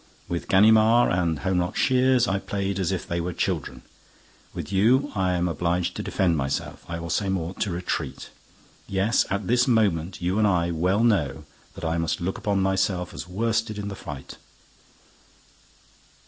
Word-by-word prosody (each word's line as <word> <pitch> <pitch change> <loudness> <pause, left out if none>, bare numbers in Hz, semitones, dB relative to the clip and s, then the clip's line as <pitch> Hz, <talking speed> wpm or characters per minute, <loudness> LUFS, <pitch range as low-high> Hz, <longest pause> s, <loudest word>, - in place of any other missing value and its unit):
With 85 -1 -4
Ganimard 110 +4 +5
and 85 -3 +1
Holmlock 90 0 0
Shears 130 -1 +3
I 95 0 0
played 100 -1 -3
as 95 -1 0
if 95 0 -3
they 85 -2 -2
were 90 +1 -3
children. 65 -4 -3 0.7
With - - -7
you, 125 +9 +3
I 95 -3 0
am 90 0 0
obliged 85 +2 -1
to - - -3
defend 90 -3 +1
myself, 75 +2 -3
I 85 - -3
will 85 0 -5
say 100 +1 0
more, 90 -2 -2
to 105 - 0
retreat. 90 0 -4 0.6
Yes, 100 +4 +1
at 100 0 -2
this 125 +5 +2
moment, 95 -7 +1
you 90 +4 0
and 105 - +4
I 85 -3 +1
well 90 +6 +1
know 75 -10 +1 0.3
that - - -7
I 80 +1 0
must 80 +2 -1
look 95 +2 -3
upon 100 -2 0
myself 95 -2 0
as - - -7
worsted 110 +3 -1
in 100 0 -4
the 100 - -6
fight. 70 -7 -9
95 Hz, 170 wpm, -25 LUFS, 85-105 Hz, 0.7 s, Ganimard